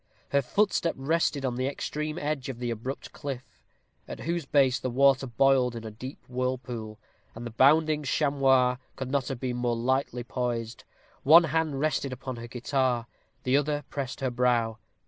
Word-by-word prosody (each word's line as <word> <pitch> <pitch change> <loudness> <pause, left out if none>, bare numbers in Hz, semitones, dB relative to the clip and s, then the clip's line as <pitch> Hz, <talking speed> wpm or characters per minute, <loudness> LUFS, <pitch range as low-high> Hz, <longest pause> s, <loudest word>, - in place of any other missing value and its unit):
Her 140 - +3
footstep 170 +4 +1
rested 145 0 0
on 125 -2 -1
the 130 +1 0
extreme 150 +2 -3
edge 145 -5 -2
of 130 - -5
the 120 -1 -2
abrupt 120 +4 -5
cliff, 135 -4 -5 0.6
at - - -7
whose 170 -3 -2
base 135 -3 +3
the 130 - -2
water 135 +1 +4
boiled 125 0 +3
in 115 - -6
a 110 - -6
deep 130 +6 -9
whirlpool, 125 -3 -3 0.4
and 115 +2 -7
the 120 - -5
bounding 150 +5 +4
chamois 135 -3 +3 0.2
could 130 -1 -5
not 140 -2 0
have 135 -3 -4
been 125 -1 -2
more 120 -1 0
lightly 125 0 0
poised. 120 -2 -3 0.4
One 165 +5 +8
small 160 - -3
hand 160 -3 0
rested 140 -2 0
upon 130 0 -6
her 115 0 -7
guitar, 125 0 0 0.4
the 130 +1 +2
other 145 +1 +1
pressed 135 -2 -4
her 130 -2 0
brow. 120 -2 +1
130 Hz, 175 wpm, -28 LUFS, 125-140 Hz, 0.6 s, One